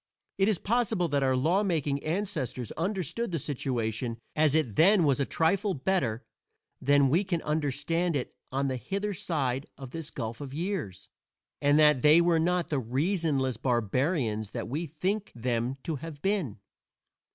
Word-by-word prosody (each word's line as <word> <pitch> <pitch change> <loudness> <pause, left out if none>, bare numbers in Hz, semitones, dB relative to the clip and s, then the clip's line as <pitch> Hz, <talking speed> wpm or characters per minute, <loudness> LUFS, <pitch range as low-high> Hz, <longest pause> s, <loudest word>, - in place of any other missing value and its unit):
It 195 - +4
is 215 -4 +2
possible 220 -3 +1
that 140 -1 +1
our 130 -1 +2
law 165 +10 +2
making 150 -8 0
ancestors 155 - -2
understood 190 - -2
the 165 - 0
situation 120 -5 -2 0.2
as 155 -1 +3
it 130 -10 +1
then 190 +2 +6
was 145 -2 +2
a 140 - 0
trifle 195 +4 +1
better 130 - 0 0.6
than 140 +1 +4
we 170 +9 +3
can 180 -4 -1
understand 150 +3 0
it 130 - -3 0.2
on 135 +1 0
the 130 -1 -1
hither 200 +9 -3
side 135 -7 -2
of 135 -2 -9
this 165 0 -5
gulf 115 -1 -5
of 140 -1 -7
years, 160 - -3 0.5
and 145 +1 +4
that 150 -4 +5
they 150 +4 +7
were 170 -1 +3
not 175 +1 +1
the 145 - 0
reasonless 135 - 0
barbarians 120 - 0
that - - -4
we 155 +8 -3
think 190 +7 -2
them 120 +2 -1
to 160 -3 -2
have 155 +1 -8
been. 190 - 0
150 Hz, 165 wpm, -29 LUFS, 130-175 Hz, 0.6 s, they